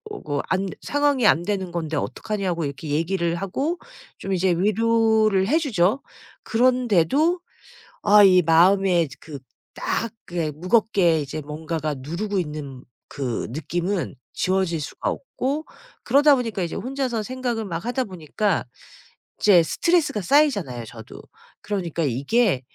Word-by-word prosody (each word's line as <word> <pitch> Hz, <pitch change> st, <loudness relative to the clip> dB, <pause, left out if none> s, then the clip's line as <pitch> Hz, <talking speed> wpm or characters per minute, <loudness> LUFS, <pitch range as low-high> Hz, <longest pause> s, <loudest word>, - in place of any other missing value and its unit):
어 -, -, -8 dB
거 145 Hz, -1 st, -2 dB
안 190 Hz, +1 st, 0 dB
상황이 290 Hz, -4 st, +1 dB
안 170 Hz, -, +4 dB
되는 190 Hz, -2 st, -2 dB
건데 160 Hz, -3 st, -3 dB
어떡하냐?"고 180 Hz, -, -2 dB
이렇게 140 Hz, +2 st, -6 dB
얘기를 170 Hz, +3 st, 0 dB
하고 270 Hz, -, -2 dB, 0.4 s
좀 195 Hz, -, -4 dB
이제 185 Hz, 0 st, +2 dB
위로를 215 Hz, +1 st, +2 dB
해 300 Hz, +8 st, +3 dB
주죠. 240 Hz, -, +1 dB, 0.4 s
그런데도 250 Hz, -, +2 dB, 0.6 s
아 210 Hz, 0 st, +7 dB
이 185 Hz, -2 st, +7 dB
마음에 175 Hz, +2 st, +4 dB
이제 140 Hz, -4 st, -8 dB
그 150 Hz, -3 st, -9 dB, 0.4 s
딱 230 Hz, -, -1 dB, 0.2 s
그게 170 Hz, -3 st, -2 dB
무겁게 185 Hz, 0 st, +2 dB
이제 145 Hz, +1 st, -5 dB
뭔가가 155 Hz, +1 st, -4 dB
누르고 180 Hz, +9 st, -3 dB
있는 150 Hz, -6 st, -6 dB, 0.3 s
그 130 Hz, -4 st, -3 dB
느낌은 170 Hz, -, -3 dB, 0.2 s
지워질 185 Hz, -3 st, 0 dB
수가 155 Hz, -, -4 dB
없고 310 Hz, -, -3 dB, 0.4 s
그러다 290 Hz, +1 st, +5 dB
보니까 230 Hz, -6 st, -3 dB
이제 170 Hz, -, -4 dB
혼자서 255 Hz, -3 st, -2 dB
생각을 245 Hz, -2 st, -3 dB
막 170 Hz, -2 st, -4 dB
하다 250 Hz, +2 st, -1 dB
보니까 185 Hz, +1 st, -2 dB, 0.7 s
이제 190 Hz, -5 st, +6 dB
스트레스가 325 Hz, -, +1 dB
쌓이잖아요 195 Hz, -, +2 dB
저도. 110 Hz, 0 st, -11 dB, 0.4 s
그러니까 175 Hz, -5 st, -3 dB
이게 140 Hz, -, +1 dB
190 Hz, 295 characters per minute, -23 LUFS, 160-230 Hz, 0.7 s, 아